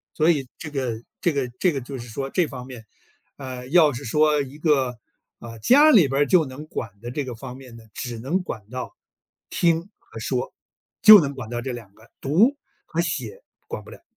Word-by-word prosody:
所 160 +2 +4
以 140 -5 -2
这 160 - -7
个 125 -5 -3 0.2
这 175 - +2
个 140 -4 -1
这 180 - +3
个 140 - -3
就 135 +2 -7
是 120 - -9
说 135 +4 -5
这 180 -4 +1
方 125 -3 -8
面， 125 -4 -10 0.5
呃， 130 -2 -7
要 155 0 +5
是 120 - -7
说 150 +3 +2
一 140 +1 -8
个， 135 -6 +1 0.4
呃， 115 -1 -10
家 290 - +6
里 190 - +6
边 135 +2 0
儿 - - +5
就 175 +2 +4
能 135 +3 -9
管 115 - -5
的 120 +1 -6
这 145 +2 -2
个 125 -2 -6
方 125 +2 -9
面 130 -3 -12
呢， 115 - -13
只 120 -2 -5
能 150 +11 -1
管 110 - -7
到 125 0 -6 0.6
听 165 -1 +2 0.2
和 - - -12
说， - - -3 0.5
就 215 -1 +12
能 140 -4 -2
管 120 -4 -7
到 120 0 -3
这 130 - -4
两 115 -5 -9
个， 115 +4 -21
读 195 - +3 0.3
和 - - -1
写 - - -4 0.3
管 - - -6
不 - - -14
了。 - - -13
135 Hz, 230 characters per minute, -23 LUFS, 125-155 Hz, 0.6 s, 就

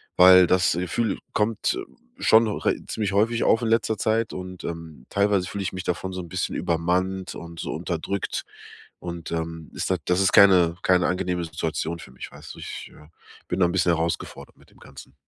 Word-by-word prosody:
weil 90 0 +8
das 90 0 +3
Gefühl 90 +5 -1
kommt 105 +1 0 0.4
schon 110 +1 +5
re 105 - 0
ziemlich 105 -3 -2
häufig 115 +4 +2
auf 115 - +3
in 115 - -1
letzter 115 -1 +1
Zeit 110 +2 0
und, 90 0 -7
ähm, 80 -6 -7
teilweise 100 -2 +1
fühl 100 - -5
ich 95 - -3
mich 90 -1 -5
davon 90 +2 -3
so 95 - -4
'n 85 - -10
bisschen 95 +3 -2
übermannt 90 +2 -1
und 85 -1 -9
so - - -4
unterdrückt, 100 -1 -3 0.6
und, 85 -1 -7
ähm, 80 -1 -4
ist - - -2
da 95 - +2
das 90 +1 +2
ist 95 +1 +2
keine 90 -4 +6
keine 90 -1 +3
angenehme 90 -1 -1
Situation 80 +1 -3
für - - -11
mich, 65 - -9
weißt - - -11
du. - - -12
Ich, - - -7
äh, 75 - -16 0.4
bin - - -2
da 90 - +5
'n - - -2
bisschen 90 -2 +3
herausgefordert 85 +1 -4
mit - - -23
dem - - -22
Ganzen. - - -13
90 Hz, 195 wpm, -24 LUFS, 85-100 Hz, 0.6 s, weil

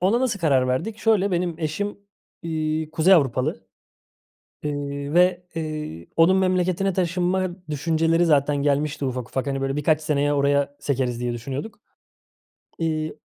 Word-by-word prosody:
ona 200 +7 +2
nasıl 220 -7 0
karar 135 -5 +3
verdik? 195 +13 -2
Şöyle, 205 -3 +2
benim 175 -2 -1
eşim, 185 +7 -3 0.4
iii, 155 -1 -2
Kuzey 165 +4 +5
Avrupalı, 130 - 0 1.0
eee, 145 0 -4
ve, 180 0 +4
eee, 155 - -5
onun 175 +4 +5
memleketine 185 +1 +1
taşınma 180 +1 0 0.2
düşünceleri 165 +3 +1
zaten 145 -2 +3
gelmişti 145 +1 0
ufak 125 -2 -4
ufak. 135 +1 -2
Hani, 135 0 -2
"Böyle 135 0 -1
birkaç 155 +1 +2
seneye 145 -2 +1
oraya 140 0 +1
sekeriz." 125 -4 -1
diye 120 -1 -2
düşünüyorduk. 135 - -6 1.0
İii, 155 -1 -2
155 Hz, 135 wpm, -23 LUFS, 140-180 Hz, 1.0 s, Kuzey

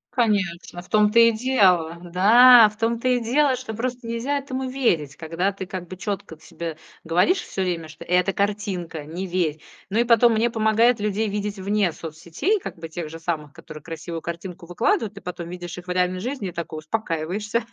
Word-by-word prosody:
Конечно, 195 -7 0
в 180 - -19
том-то 210 +2 +4
и 230 0 +7
дело, 195 -9 +2
да, 220 +7 +7
в 215 - -17
том-то 230 +2 0
и 250 -1 +3
дело, 270 +3 +3
что 245 -3 -7
просто 245 +1 -4
нельзя 245 +5 -1
этому 265 -1 -4
верить. 180 - 0
Когда 165 +5 -1
ты 190 -1 -7
как 180 -2 -6
бы 185 - -9
чётко 200 -5 -5
себе 165 -1 -7 0.3
говоришь 180 - +2
всё 190 - -5
время, 170 -3 -2
что: 155 0 -11
"Это 180 +2 +2
картинка! 195 -6 -2
Не 175 +5 -5
верь!" 170 -4 -1 0.3
Ну 220 - +1
и - - +5
потом 235 0 +5
мне 230 +2 +2
помогает 225 +1 +3
людей 210 +1 -1
видеть 205 0 -3
вне 200 -1 +1
соцсетей, 170 - -2
как - - -7
бы 165 0 -8
тех 160 -1 -5
же 165 - -9
самых, 155 -3 -4
которые 155 -1 -11
красивую 165 0 -6
картинку 170 +1 -7
выкладывают. 225 - 0
Ты 200 - -11
потом 175 -1 -6
видишь 175 -1 -7
их 180 - -9
в - - -3
реальной 180 0 +1
жизни 235 -3 -4
и - - -8
такой 165 -2 -6
успокаиваешься, 195 +5 -2
195 Hz, 195 wpm, -23 LUFS, 170-230 Hz, 0.3 s, и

